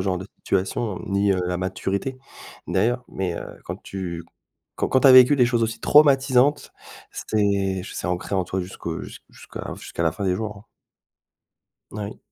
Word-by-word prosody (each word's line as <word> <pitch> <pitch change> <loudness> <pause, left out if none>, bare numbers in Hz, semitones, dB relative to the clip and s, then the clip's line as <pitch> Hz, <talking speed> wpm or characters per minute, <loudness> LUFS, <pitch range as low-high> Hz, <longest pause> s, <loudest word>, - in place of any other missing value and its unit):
genre 95 -1 0
de 95 - -7
situation, 95 +2 -1
ni, 100 0 +2
heu, 90 - 0
la 90 0 -1
maturité 95 +7 -3 0.5
d'ailleurs, 120 +6 +1
mais, 90 -3 -3
heu, - - -6 0.2
quand - - -7
tu 85 -3 -5 0.5
quand - - -1
quand 130 - +3
tu 140 - +7
as - - +9
vécu 130 +3 +8
des 125 -3 +4
choses 120 -1 +1
aussi 115 0 -1
traumatisantes 140 -1 +4 0.4
c'est, 100 -3 0
j - - -9
c'est - - -4
ancré 90 +2 -3
en 95 -1 +1
toi 95 +1 -3
jusqu'au 90 -2 -5
jus - - -10
jusqu'à - - -9
jusqu'à - - -7
la 80 - +2
fin 100 - -5
des 90 - +2
jours, 105 -1 -5
hein. 100 - -16 1.3
Oui, 105 -1 -6
100 Hz, 180 wpm, -23 LUFS, 95-120 Hz, 1.3 s, as